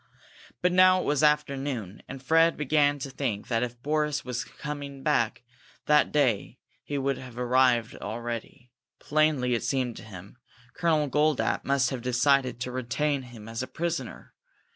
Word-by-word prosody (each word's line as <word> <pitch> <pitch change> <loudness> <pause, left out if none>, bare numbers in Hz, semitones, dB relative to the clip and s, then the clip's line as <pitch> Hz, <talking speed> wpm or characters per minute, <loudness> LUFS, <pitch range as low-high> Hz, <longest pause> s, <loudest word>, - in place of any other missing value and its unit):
By 180 - +5
now 185 +1 +6
it - - -2
was 145 -1 +1
afternoon, 140 -8 0
and 135 -1 -9
Fred 165 +4 +4
began 145 0 +2
to 135 0 -6
think 120 -7 -3
that 115 -2 +1
if 120 -1 -4
Boris 150 0 0
had - - -26
been 125 +2 -5
coming 140 -2 -6
back 120 -1 +1 0.4
that 150 0 +4
day 130 -9 +1 0.3
he 145 - -4
would 135 -1 -1
have 125 -2 -11
arrived 125 -2 +2
already. 120 +3 -6 0.3
Plainly, 150 -5 +1
it 115 - 0
seemed 130 -4 -1
to - - -10
him, 100 +2 -12 0.3
Colonel 160 -4 +1
Goldapp 150 +1 +1
must 135 -1 +2
have 130 -3 -4
decided 125 0 +2
to 125 - -3
retain 130 +3 -1
him 120 -4 -12
as 115 +1 -4
a 130 - -4
prisoner. 170 0 -4
135 Hz, 165 wpm, -27 LUFS, 120-150 Hz, 0.4 s, now